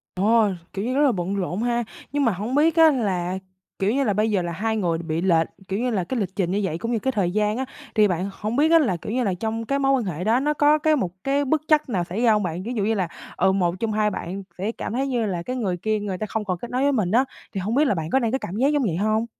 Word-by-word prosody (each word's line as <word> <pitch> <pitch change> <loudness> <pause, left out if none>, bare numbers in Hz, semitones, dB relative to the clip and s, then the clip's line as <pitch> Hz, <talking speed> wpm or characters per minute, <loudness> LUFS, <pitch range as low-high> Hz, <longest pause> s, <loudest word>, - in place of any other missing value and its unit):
Ồ, 215 +4 +4 0.3
kiểu 195 - -3
như, 250 +2 -1
rất 280 - +2
là 280 -3 +4
bận 185 -1 -2
rộn 190 +1 -2
ha. 240 0 0 0.3
Nhưng 290 -1 +1
mà 230 - +3
hổng 210 +7 -4
biết 315 +3 +3
á, 325 -1 +7
là, 190 - -1 0.4
kiểu 195 +1 +1
như, 275 +2 +1
là 215 - +2
bây 215 +2 +1
giờ 195 -4 +1
là, 170 0 -3
hai 220 +6 -1
người 175 -6 0
bị 165 -1 -2
lệch, 165 -3 +3 0.2
kiểu 195 - -1
như 250 +1 0
là, 195 -6 0
cái 255 +5 -2
lịch 190 -2 -4
trình 180 -4 0
như 200 +2 0
vậy, 165 -4 -2
cũng 230 +6 -3
như 230 - +1
cái 265 +4 -1
thời 195 -7 0
gian 210 +2 +1
á, 260 - -1 0.3
thì 215 -2 +5
bạn 185 +2 -1
hổng 215 +4 -4
biết 305 +3 +4
á, 330 - +7
là 240 - +1
kiểu 170 - -6
như 250 +1 0
là, 195 -4 0
trong 225 +4 -3
cái 275 +3 0
mối 270 -1 +2
quan 260 -4 +1
hệ 180 -2 -4
đó, 225 +4 +3
nó 300 +2 +1
có 295 +1 +4
cái 310 0 +2
một 215 -11 -1
cái 280 +1 +1
bất 305 +3 +1
trắc 305 -2 +3
nào 190 -8 0
xảy 190 +7 -4
ra 235 -2 +5
hông 210 -1 +2
bạn? 175 -1 -3
Ví 230 +5 -4
dụ 210 -4 0
như 220 +2 +1
là, 185 -5 -1 0.3
ừ, 190 +1 +3
một 180 -3 +1
trong 225 -1 -1
hai 210 0 +2
bạn 190 0 -5 0.2
sẽ 205 +5 -2
cảm - - -5
thấy 265 +4 0
như 240 -4 0
là 180 -4 -2
cái 255 +8 -4
người 195 -8 -1
kia 215 +4 -1
người 195 -3 -4
ta 215 - -3
không 215 +1 -3
còn 185 -3 -2
kết 240 - -8
nối 255 +2 0
với 285 +1 +3
mình 210 -9 0
á, 240 +6 +4 0.3
thì 195 - -1
hông 210 +5 -2
biết 290 +4 +4
là 270 - +2
bạn 160 -2 -4
có 265 - +4
đang 235 -3 0
có 265 - +1
cảm 190 -6 -6
giác 255 +5 +2
giống 295 -1 +2
vậy 185 -9 0
hông? 215 +4 +1
215 Hz, 320 wpm, -23 LUFS, 185-255 Hz, 0.4 s, á